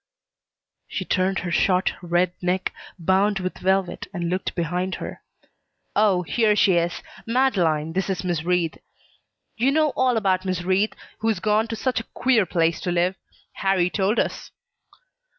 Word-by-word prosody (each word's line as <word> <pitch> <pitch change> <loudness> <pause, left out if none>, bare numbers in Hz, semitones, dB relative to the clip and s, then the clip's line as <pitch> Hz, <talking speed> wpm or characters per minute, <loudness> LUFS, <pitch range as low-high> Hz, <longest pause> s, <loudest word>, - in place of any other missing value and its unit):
She - - -4
turned 185 +1 +1
her 175 - -2
short, 185 +1 +2
red 175 0 +1
neck, 180 +1 -1 0.2
bound 190 +4 +2
with 185 -1 -4
velvet, 190 -1 0
and 175 -3 -3
looked 185 +1 -2
behind 180 +2 -1
her. - - -7 0.7
"Oh, 200 -4 +3
here 210 +6 +2
she 200 -2 +4
is! 170 +1 -1 0.2
Madeleine, 175 - +1
this 190 +2 -1
is 190 - -2
Miss 175 -4 -1
Wreath. 175 -2 0 0.8
You 250 +4 +3
know 310 +1 +3
all 255 -2 +2
about 190 -3 +1
Miss 185 -2 -2
Wreath, 190 +4 +1 0.3
who's 220 -3 0
gone 215 +3 +2
to 225 - -4
such 255 +2 -1
a - - -6
queer 240 -7 +3
place 165 -1 +1
to 180 - -2
live. 175 +1 +2 0.4
Harrie 190 -3 +2
told 200 +3 +1
us." - - -1
185 Hz, 155 wpm, -23 LUFS, 175-210 Hz, 0.8 s, she